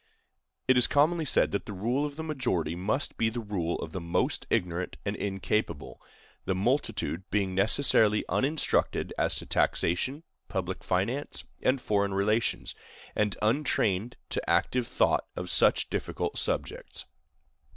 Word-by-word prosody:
It 130 Hz, 0 st, +5 dB
is 125 Hz, -, +5 dB
commonly 160 Hz, +3 st, +3 dB
said -, -, +3 dB
that 100 Hz, -, -3 dB
the 105 Hz, -, -5 dB
rule 120 Hz, +9 st, 0 dB
of 145 Hz, -, -9 dB
the 160 Hz, -, -5 dB
majority 125 Hz, -, -1 dB
must 105 Hz, +10 st, -1 dB
be 115 Hz, -, +2 dB
the 115 Hz, +2 st, -4 dB
rule 95 Hz, -6 st, -2 dB
of 80 Hz, -, -7 dB
the 95 Hz, -, -5 dB
most 85 Hz, 0 st, -1 dB
ignorant 90 Hz, 0 st, -1 dB
and 100 Hz, 0 st, -1 dB
incapable, 95 Hz, -4 st, -2 dB, 0.4 s
the 95 Hz, -, 0 dB
multitude 105 Hz, -, 0 dB
being 100 Hz, -2 st, 0 dB
necessarily 105 Hz, +1 st, +4 dB
uninstructed 150 Hz, +4 st, 0 dB
as -, -, +2 dB
to -, -, -3 dB
taxation, 130 Hz, -, +1 dB, 0.2 s
public 95 Hz, -2 st, -3 dB
finance, 115 Hz, +11 st, -1 dB, 0.2 s
and 130 Hz, +1 st, +2 dB
foreign 100 Hz, -4 st, 0 dB
relations, 105 Hz, +4 st, 0 dB, 0.4 s
and 105 Hz, -3 st, 0 dB
untrained 110 Hz, -3 st, +1 dB
to -, -, -3 dB
active 125 Hz, -2 st, +2 dB
thought -, -, +1 dB
on -, -, -3 dB
such -, -, +3 dB
difficult -, -, -2 dB
subjects. -, -, -2 dB
105 Hz, 140 wpm, -29 LUFS, 95-130 Hz, 0.4 s, It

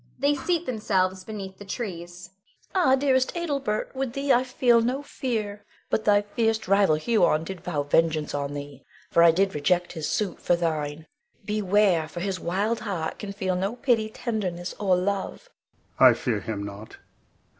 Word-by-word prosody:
[They 285 Hz, +2 st, +2 dB
seat 340 Hz, +4 st, -1 dB
themselves 190 Hz, -5 st, 0 dB
beneath 195 Hz, -3 st, -7 dB
the -, -, -8 dB
trees. 180 Hz, -4 st, -6 dB, 0.4 s
Bianca. 365 Hz, -7 st, +3 dB
Ah, 260 Hz, -, +6 dB
dearest 265 Hz, +1 st, +1 dB
Adelbert, 275 Hz, -10 st, -2 dB
with 265 Hz, -2 st, -2 dB
thee 275 Hz, 0 st, +2 dB
I 245 Hz, -, +4 dB
feel 250 Hz, -2 st, +3 dB
no 255 Hz, +5 st, -1 dB
fear, 215 Hz, -8 st, -3 dB, 0.3 s
but 220 Hz, -, 0 dB
thy 205 Hz, -1 st, +4 dB
fierce 220 Hz, +1 st, -1 dB
rival 195 Hz, -4 st, +4 dB
Huon 160 Hz, -3 st, +2 dB
did 180 Hz, 0 st, -7 dB
vow 170 Hz, -6 st, -2 dB
vengeance 155 Hz, +1 st, +1 dB
on 145 Hz, 0 st, -3 dB
thee, 145 Hz, -2 st, -8 dB, 0.3 s
for 170 Hz, -, +4 dB
I 170 Hz, -, +8 dB
did 190 Hz, +4 st, +2 dB
reject 175 Hz, +4 st, +1 dB
his 160 Hz, -3 st, -3 dB
suit 200 Hz, -5 st, -1 dB
for 175 Hz, -, +3 dB
thine. 155 Hz, -2 st, -2 dB, 0.4 s
Beware! 205 Hz, -5 st, +2 dB
for 160 Hz, +2 st, -7 dB
his 190 Hz, 0 st, -2 dB
wild 205 Hz, +7 st, -1 dB
heart 185 Hz, -7 st, -4 dB
can 205 Hz, -, -5 dB
feel 190 Hz, -2 st, -2 dB
no 195 Hz, +5 st, -1 dB
pity, 240 Hz, -4 st, +1 dB
tenderness, 195 Hz, -7 st, -3 dB
or 195 Hz, -3 st, +3 dB
love. 195 Hz, +2 st, -3 dB, 0.5 s
Adel. -, -, +9 dB
I -, -, +5 dB
fear -, -, -1 dB
him 105 Hz, -2 st, -4 dB
not. 100 Hz, +2 st, -9 dB
195 Hz, 175 wpm, -26 LUFS, 170-230 Hz, 0.5 s, Adel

